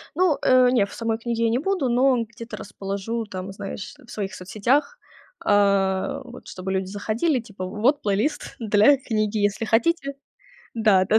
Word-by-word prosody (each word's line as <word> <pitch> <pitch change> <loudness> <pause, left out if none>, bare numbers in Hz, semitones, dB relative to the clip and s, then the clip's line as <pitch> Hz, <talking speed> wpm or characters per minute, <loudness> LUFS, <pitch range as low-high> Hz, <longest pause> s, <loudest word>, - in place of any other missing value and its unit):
Ну, 350 -3 +3
э, 255 -1 +6
нет, 210 -6 +2
в - - -11
самой 225 -1 -1
книге 230 0 -2
я - - +3
не 230 - +2
буду, 365 -3 0
но 250 0 +3
где-то 230 -1 -9
расположу 205 +3 -4
там, 190 -1 -6
знаешь, 195 0 -7
в - - -21
своих 200 -1 -4
соцсетях. 240 - 0 0.5
А, 200 +5 +2
вот 250 -1 -12
чтобы 185 +1 -5
люди 190 0 0
заходили, 220 - 0
типа, 205 -5 -7
вот 230 +10 +1
плейлист 215 +9 -1
для 220 +5 +5
книги, 215 -4 -1
если 205 +2 0
хотите. 275 +6 +1 0.6
Да-да, 215 -2 +4
225 Hz, 160 wpm, -24 LUFS, 200-255 Hz, 0.6 s, э